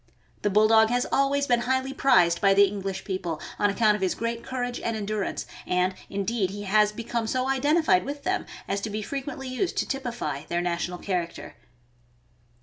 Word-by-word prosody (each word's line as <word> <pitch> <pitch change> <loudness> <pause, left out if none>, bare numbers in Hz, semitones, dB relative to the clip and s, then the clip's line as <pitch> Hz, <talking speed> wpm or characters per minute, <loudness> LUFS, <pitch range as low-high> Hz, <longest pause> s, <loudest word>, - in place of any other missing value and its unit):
The 205 - +1
Bulldog 220 +2 +5
has 245 +1 +1
always 280 +1 +2
been 245 -3 +3
highly 260 +2 0
prized 175 -12 +4
by 195 -1 +5
the 200 0 +7
Eng 200 0 -5
lish 190 0 -4
people, 175 -5 -3 0.2
on 205 - +3
account 210 +1 +3
of 210 - -3
his 190 -2 +1
great 230 0 -3
courage 245 -1 -3
and 230 -1 -2
endurance; 210 -1 -3 0.2
and, 180 +1 +1 0.2
indeed, 200 0 -1
he 205 +2 -6
has 210 +1 +3
"become 230 +1 -3
so 255 +3 0
identified 270 - +3
with 285 +1 -6
them 375 0 -1 0.2
as 200 - -1
to 220 - -3
be 210 +1 -3
frequently 270 +1 -5
used 255 +9 -2
to - - 0
typify 235 - -3
their 170 - -1
national 175 0 -2
character." 175 -3 -4
215 Hz, 185 wpm, -26 LUFS, 195-255 Hz, 0.2 s, the